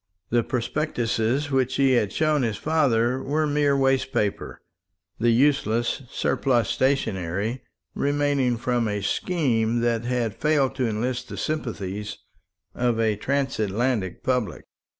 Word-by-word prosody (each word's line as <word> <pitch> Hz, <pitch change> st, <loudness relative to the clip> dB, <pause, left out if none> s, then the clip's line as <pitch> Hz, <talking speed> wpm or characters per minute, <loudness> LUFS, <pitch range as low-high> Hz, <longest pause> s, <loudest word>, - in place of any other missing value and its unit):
The 120 Hz, 0 st, +4 dB
prospectuses 125 Hz, +1 st, -1 dB
which 130 Hz, -1 st, +1 dB
he 135 Hz, -1 st, +3 dB
had 120 Hz, -6 st, +2 dB
shown 155 Hz, -2 st, +1 dB
his 115 Hz, -4 st, -1 dB
father 130 Hz, -5 st, +1 dB
were 155 Hz, +3 st, 0 dB
mere 145 Hz, -1 st, +2 dB
waste 135 Hz, -1 st, +2 dB
paper, 105 Hz, -2 st, -2 dB, 0.6 s
the 120 Hz, +2 st, +3 dB
useless 120 Hz, -1 st, +2 dB
surplus 120 Hz, -6 st, +1 dB
stationery 110 Hz, -4 st, 0 dB, 0.3 s
remaining 140 Hz, -3 st, +1 dB
from 120 Hz, -1 st, 0 dB
a 105 Hz, -1 st, -2 dB
scheme 120 Hz, -, 0 dB
that 115 Hz, -1 st, +1 dB
had 120 Hz, -3 st, -1 dB
failed 145 Hz, -4 st, +1 dB
to 130 Hz, -3 st, +1 dB
enlist 120 Hz, +4 st, -2 dB
the -, -, -7 dB
sympathies 105 Hz, -9 st, -4 dB, 0.6 s
of 120 Hz, -2 st, 0 dB
a 110 Hz, -2 st, +2 dB
Transatlantic 120 Hz, -4 st, -1 dB
public. 125 Hz, -4 st, -1 dB
125 Hz, 125 wpm, -24 LUFS, 115-140 Hz, 0.6 s, The